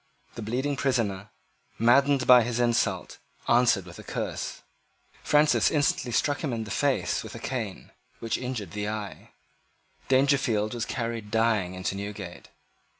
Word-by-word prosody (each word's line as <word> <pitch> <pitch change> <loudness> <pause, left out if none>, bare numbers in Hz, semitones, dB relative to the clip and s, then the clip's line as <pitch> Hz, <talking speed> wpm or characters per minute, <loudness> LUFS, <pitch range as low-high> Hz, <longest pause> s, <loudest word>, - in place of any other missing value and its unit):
The - - -7
bleeding 130 +6 -1
prisoner, 105 -8 -1 0.5
maddened 135 +3 +4
by 125 -2 +8
this 120 0 -2
insult, 120 -1 0 0.3
answered 120 -5 +3
with 90 -1 -11
a - - -9
curse. - - -4 0.6
Francis 150 0 +4
instantly 145 -4 +1
struck 145 +6 0
him 145 - -1
in 115 -1 -2
the 105 - -8
face 140 +3 0
with - - -9
a - - -7
cane 115 -7 -5 0.3
which 115 -1 -2
injured 125 -8 -4
the 105 0 -3
eye. 105 -2 -6 0.8
Dangerfield 130 -6 +2
was 120 -1 -2
carried 115 -3 -4
dying 110 -5 +1
into 95 +1 -3
Newgate. 100 -2 -7
115 Hz, 145 wpm, -27 LUFS, 105-130 Hz, 0.8 s, by